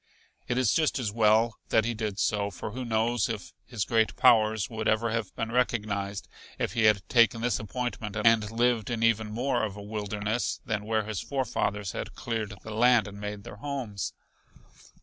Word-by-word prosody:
It 125 - -1
is 130 -4 +3
just 155 -2 +2
as 120 -6 -2
well 110 +1 +3
that 110 -1 +3
he 120 - 0
did 105 -3 -3
so, 100 -1 +1
for 100 +2 -6
who 130 +3 -5
knows 115 -1 +1
if - - -5
his 115 -5 -2
great 110 -2 +2
powers 110 -5 +4
would 110 -1 -4
ever 110 +1 +2
have 115 -3 -2
been 115 0 -3
recognized 105 -5 -1 0.3
if - - -2
he 110 -1 +2
had 105 -2 +3
taken 115 -2 +4
this 120 -5 +1
appointment 110 -2 -4
and 115 -2 +5
lived 115 -1 +1
in 115 -2 -1
even 110 -1 +3
more 120 +3 0
of 105 -2 -2
a 100 - -8
wilderness 105 +2 -2
than 105 -2 -2
where 110 0 +1
his 105 -3 -4
forefathers 105 -7 -2
had - - -6
cleared 110 -3 -3
the 110 - -7
land 120 -1 +4
and 100 0 -9
made 105 -1 -5
their 105 - -10
homes? 120 -6 -4
110 Hz, 190 wpm, -28 LUFS, 105-120 Hz, 0.3 s, and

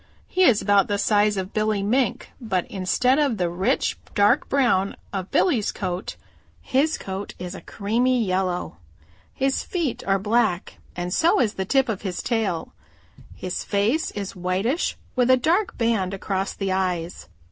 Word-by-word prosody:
He 370 - -1
is 225 -9 +4
about 200 -2 +4
the 205 - 0
size 210 0 +2
of 190 +1 -4
Billy 215 -2 0
Mink, 245 +5 0
but 190 -6 -1
instead 225 +8 +2
of 280 -7 +1
the 180 -2 0
rich 180 +2 0 0.2
dark 205 0 +3
brown 235 -8 +2 0.2
of 190 -1 -3
Billy's 250 - +2
coat 185 -1 -4 0.4
his 290 +5 +1
coat 195 +1 -6
is 180 0 -6
a - - -8
creamy 235 +4 0
yellow. 185 - -1 0.6
His 270 0 +1
feet 335 -8 -2
are 195 0 +3
black 205 -3 0 0.2
and 175 +1 -3
so 335 +2 +3
is 225 -5 +2
the 190 - -3
tip 270 +6 +2
of 215 -5 -3
his 185 -3 -4
tail. 215 -8 -1 0.6
His 185 -1 -4
face 215 +10 +1
is 200 -2 -6
whitish 190 - -1 0.2
with 250 0 +2
a 255 - +7
dark 350 - +1
band 220 -5 0
across 195 0 -2
the 195 -1 -2
eyes. 180 -2 -2
205 Hz, 160 wpm, -24 LUFS, 185-245 Hz, 0.6 s, a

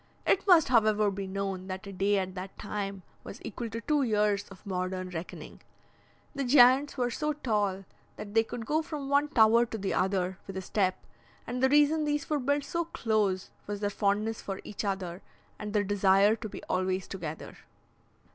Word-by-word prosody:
It 395 - +2
must, 335 -7 +6
however, 215 -3 +3
be 195 0 -5
known 190 -1 -4
that 190 +2 -6
a 200 - -8
day 200 +2 +2
at 185 -1 -2
that 190 +1 -8
time 200 -2 -4 0.2
was 220 - -9
equal 235 -2 -5
to 230 +2 -5
two 295 +3 +1
years 210 -4 +1
of 195 +1 -14
modern 185 -1 -3
reckoning. 170 0 -8 0.7
The 280 - -2
giants 260 +2 +5
were 245 -1 0
so 300 +4 -1
tall 205 -8 -1 0.3
that 205 -1 -8
they 225 0 +4
could 225 0 -6
go 310 +7 +1
from 295 -4 -6
one 285 +1 +3
tower 230 -3 +5
to 225 - -5
the 195 -2 -2
other 190 0 0
with 195 -1 -6
a - - -2
step, 185 -1 0 0.5
and 250 +1 -4
the 265 - +4
reason 295 +2 +4
these 295 -1 -1
were 300 - +2
built 285 +2 0
so 340 +4 -2
close 215 - -1 0.2
was 205 0 -4
their 205 0 -1
fondness 210 +2 0
for 195 -1 -5
each 210 - -6
other, 190 -3 -3 0.4
and 210 0 -5
their 210 -1 +2
desire 200 +1 +4
to 220 -1 -7
be - - -9
always 185 0 -1
together." 160 -5 -7
210 Hz, 190 wpm, -29 LUFS, 190-250 Hz, 0.7 s, must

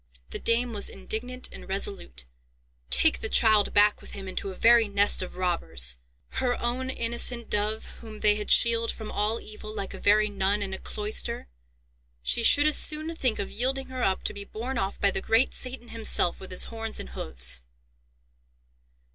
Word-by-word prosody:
The - - -4
dame 235 +1 +1
was 205 -2 -1
indignant 245 +6 -3
and - - -10
resolute: 190 - -3 0.6
"Take 65 0 +4
the - - -2
child 215 -2 +4
back 205 0 +4
with - - -12
him 195 -1 -7
into 190 +1 -4
a 190 - -8
very 230 +1 +5
nest 200 0 +3
of 185 - -6
robbers!—her 65 - -1
own 250 +2 -2
innocent 235 -1 -1
dove 210 +1 -1
whom 220 -2 -11
they 210 -1 +5
had 210 0 -5
shielded 230 -1 +4
from 220 -1 -8
all 215 +2 +1
evil 215 0 -10
like 200 -3 -6
a - - -8
very 210 +1 +3
nun 200 0 0
in 190 -1 -4
a 190 - -5
cloister! 215 - -2 0.7
She - - 0
should 285 +5 +6
as 305 - +3
soon 310 +2 +2
think 255 -8 0
of 200 - -4
yielding 260 +4 -2
her 260 -1 -5
up 190 -5 0
to - - -2
be 200 -1 -7
borne 235 +5 -5
off 195 +1 -3
by 200 - +3
the 190 - -3
great 225 +6 +3
Satan 255 -2 -5
himself 225 -6 0
with 190 - -10
his 185 - -1
horns 225 -1 -5
and - - -7
hoofs." - - 0
215 Hz, 180 wpm, -27 LUFS, 195-235 Hz, 0.7 s, should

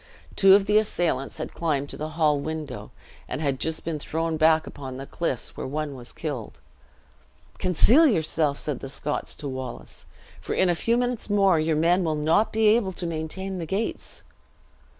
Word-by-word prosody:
Two 195 0 +7
of 200 -1 +3
the 210 +1 +5
assailants 175 -10 -1
had - - -5
climbed 145 -4 -1
to - - -6
the 155 +1 -4
hall 150 -3 +3
window; 155 -3 -5 0.4
and 130 - -4
had 140 -4 -1
just 160 0 -2
been 160 -2 -2
thrown 165 +2 -2
back 160 0 +4
upon 130 -2 -8
the 135 - -6
cliffs, 135 -5 -3
where - - -5
one 150 +1 -3
was 125 -2 -10
killed. 140 -8 -6 1.0
"Conceal 240 - +5
yourself," 160 - +1
said 145 -4 -3
the 135 - -7
Scots 145 +2 -3
to 145 - -6
Wallace; 130 -1 -6 0.3
"for - - -3
in 185 - +3
a - - +4
few 230 +7 +1
minutes 245 -3 -1
more 195 -4 +4
your 155 0 +1
men 175 +4 +3
will 160 -2 0
not 160 +8 +2
be 220 0 +1
able 210 -4 +2
to 180 - -4
maintain 170 +4 -4
the 165 - -4
gates." 200 +7 -3
160 Hz, 185 wpm, -25 LUFS, 145-190 Hz, 1.0 s, Two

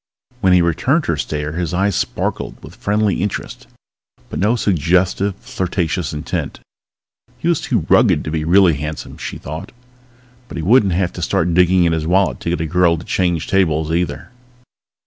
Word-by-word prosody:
When 95 -5 +3
he 90 -1 +5
returned 125 - +1
her 85 - 0
stare 75 0 -3
his 85 +1 -3
eyes 100 +1 +1
sparkled - - -2
with - - -11
friendly 105 -2 0
interest, 100 +1 -4 0.6
but - - -4
no 105 +5 +2
suggestive, 95 0 +1
flirtatious 90 -4 -2
intent. 75 0 -4 0.8
He - - -4
was 170 -3 +2
too 110 - -1
rugged - - +4
to 75 - -4
be 80 -1 -1
really 90 +1 +5
handsome, 75 +2 -6
she - - -5
thought, 80 +3 -7 0.8
but - - -8
he 80 - -3
wouldn't 100 0 +4
have 90 0 0
to 90 - -7
start 85 +1 0
digging 90 +1 +4
in 85 -1 +2
his 80 -1 -2
wallet 95 +2 +2
to - - -4
get 85 -1 -1
a - - -1
girl 85 +1 +2
to 80 - -9
change 85 -3 0
tables, 80 -5 +1
either. 85 +3 -2
90 Hz, 175 wpm, -18 LUFS, 80-95 Hz, 0.8 s, he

